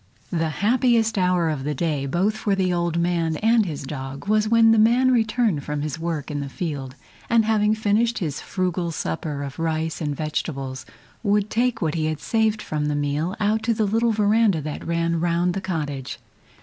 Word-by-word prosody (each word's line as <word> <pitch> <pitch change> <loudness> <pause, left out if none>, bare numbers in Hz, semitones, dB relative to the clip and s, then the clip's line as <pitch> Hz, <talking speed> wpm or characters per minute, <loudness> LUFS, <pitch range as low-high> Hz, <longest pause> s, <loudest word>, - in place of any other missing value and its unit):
The 165 -2 0 0.2
happiest 230 -1 +3
hour 180 -3 +2
of 150 -4 -2
the 150 +1 -2
day 145 -2 -1
both 190 +9 +1
for 205 -2 0
the 185 -2 +1
old 170 -1 0
man 170 -2 0
and 225 -1 +3
his 150 -4 -5
dog 135 +3 -6
was 215 0 +2
when 230 0 +6
the 225 - +4
man 245 +4 +4
returned 220 - +1
from 150 -1 -3
his 155 +1 -4
work 160 -3 -3
in 145 - -2
the 140 -1 -4
field, 140 -5 -5 0.3
and 230 -2 +4
having 215 -1 +2
finished 220 +2 +1
his 155 -7 -3
frugal 180 -2 -2
supper 145 - -3
of 140 0 -7
rice 160 0 -2
and 145 -2 -2
vegetables, 135 -3 -4 0.3
would 205 -1 +1
take 235 -2 +1
what 155 -2 0
he 160 -2 -1
had 155 -1 -2
saved 220 -1 0
from 150 -1 -2
the 150 - 0
meal 145 +5 -1
out 215 +1 +1
to 230 0 0
the 215 -1 +1
little 225 +3 +2
veranda 210 -3 +3
that 150 0 -5
ran 170 0 0
round 175 +1 +1
the 195 - -3
cottage. 150 -8 -4
175 Hz, 195 wpm, -23 LUFS, 150-215 Hz, 0.3 s, when